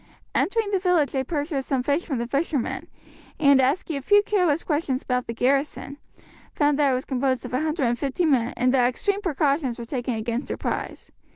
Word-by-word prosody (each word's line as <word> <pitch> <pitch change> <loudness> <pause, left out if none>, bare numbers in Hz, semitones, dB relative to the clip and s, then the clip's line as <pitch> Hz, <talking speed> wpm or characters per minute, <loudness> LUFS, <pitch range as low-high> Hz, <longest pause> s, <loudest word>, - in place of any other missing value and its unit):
Entering 435 0 0
the 390 - +2
village 360 -6 +2
they 265 -1 -1
purchased 290 -1 -3
some 265 -3 +1
fish 285 +6 0
from 280 -6 -2
the 235 - -2
fishermen, 280 +1 -2 0.5
and 280 -3 +5
asking 285 +3 0
a - - -5
few 410 +8 +4
careless 360 -7 +1
questions 290 -4 -1
about 250 -1 -1
the - - -3
garrison, 275 +3 0 0.6
found 295 -1 +2
that 285 -2 +4
it - - +2
was 255 - -3
composed 260 -1 -1
of - - -7
150 280 0 0
men, 255 -6 +2
and 250 +1 +2
that 250 -2 +4
extreme 400 +11 -1
precautions 285 - 0
were 235 - -6
taken 245 -1 -3
against 230 +4 -3
surprise. - - -4
275 Hz, 185 wpm, -24 LUFS, 255-315 Hz, 0.6 s, and